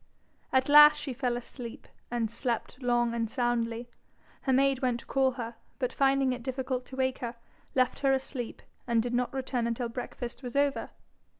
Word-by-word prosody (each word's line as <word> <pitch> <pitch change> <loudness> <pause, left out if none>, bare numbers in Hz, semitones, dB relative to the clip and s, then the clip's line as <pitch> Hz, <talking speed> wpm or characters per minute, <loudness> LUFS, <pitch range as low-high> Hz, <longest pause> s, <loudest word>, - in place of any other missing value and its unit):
At 260 0 +3
last 295 +1 +9
she 270 - -4
fell 245 -1 -1
asleep, 240 -1 -8 0.2
and 235 -2 -1
slept 240 +1 -3
long 240 -1 +2
and 230 -1 -1
soundly. 240 -1 -1 0.5
Her 265 - 0
maid 270 0 +3
went 245 -2 0
to - - -18
call 265 -1 +2
her, 235 -2 -5 0.2
but 255 -2 -1
finding 270 -1 +3
it 250 - -6
difficult 255 0 -3
to 260 - -9
wake 260 -1 0
her, 240 -1 -4 0.4
left 255 -1 +2
her 275 -1 +3
asleep, 265 -2 -3 0.2
and 230 -2 +3
did 245 0 -3
not 245 0 +1
return 260 -3 -1
until 235 +1 -2
breakfast 245 +1 -6
was 245 -1 -7
over. 280 0 +1
250 Hz, 180 wpm, -29 LUFS, 240-265 Hz, 0.5 s, last